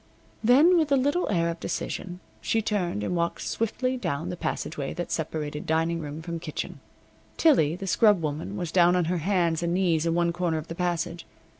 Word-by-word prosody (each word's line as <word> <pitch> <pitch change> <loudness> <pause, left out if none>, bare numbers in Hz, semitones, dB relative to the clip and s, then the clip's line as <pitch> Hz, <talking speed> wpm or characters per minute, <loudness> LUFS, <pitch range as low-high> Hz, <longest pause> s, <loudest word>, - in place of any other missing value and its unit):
Then, 290 +10 +6
with 310 -3 0
a - - +6
little 285 +7 +1
air 170 -4 +1
of 165 0 -4
decision, 180 +2 -4 0.2
she 225 - +1
turned 190 - -1
and 180 - -1
walked 170 0 -1
swiftly 255 +3 -1
down 165 - -3
the 180 - -3
passageway 150 -4 -3
that 175 0 -4
separated 150 -2 -3
dining 165 +1 +1
room 150 0 -6
from 170 0 -4
kitchen. - - -5 0.6
Tillie, 210 - +4
the 195 - -6
scrub 205 0 +4
woman, 160 +5 -4
was 175 -4 -3
down 175 0 +5
on 180 -2 +2
her 175 +1 0
hands 170 -2 +1
and 170 0 0
knees 170 -4 +2
in 165 - +1
one 170 0 +2
corner 175 -2 0
of 155 +1 -6
the - - -3
passage. 170 -1 -2
175 Hz, 195 wpm, -26 LUFS, 160-195 Hz, 0.6 s, Then